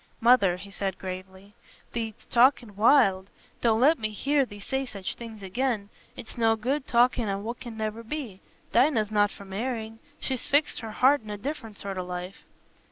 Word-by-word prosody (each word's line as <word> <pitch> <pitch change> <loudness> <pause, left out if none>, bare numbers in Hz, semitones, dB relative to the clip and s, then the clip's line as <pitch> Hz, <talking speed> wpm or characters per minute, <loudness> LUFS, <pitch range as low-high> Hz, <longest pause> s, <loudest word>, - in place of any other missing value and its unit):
"Mother," 225 -7 +5
he 200 +2 -10
said, 195 -1 -3
gravely, 190 +2 -8 0.4
"thee't 225 -2 -3 0.2
talking 245 -3 +4
wild. 200 -4 +4 0.3
Don't 225 -2 +3
let 295 +5 +5
me 215 -1 -1
hear 275 +5 +1
thee 205 -2 -11
say 265 +6 -2
such 200 -7 -5
things 225 -3 -10
again. 215 +1 -1 0.3
It's 230 - -9
no 225 -1 +4
good 260 +6 -2
talking 240 -2 +3
o' 195 - 0
what 225 +4 -5
can 235 -3 -8
never 220 +1 -3
be. 230 -5 -6 0.3
Dinah's 235 -4 +3
not 205 -1 +3
for 200 - -12
marrying; 225 +2 -4 0.2
she's 260 -2 -3
fixed 290 +2 +2
her 225 - -6
heart 260 +6 +4
on 215 - -12
a 210 - -4
different 225 -3 -6
sort 195 -2 -5
o' - - -2
life." 180 +1 -7
220 Hz, 180 wpm, -27 LUFS, 200-250 Hz, 0.4 s, Mother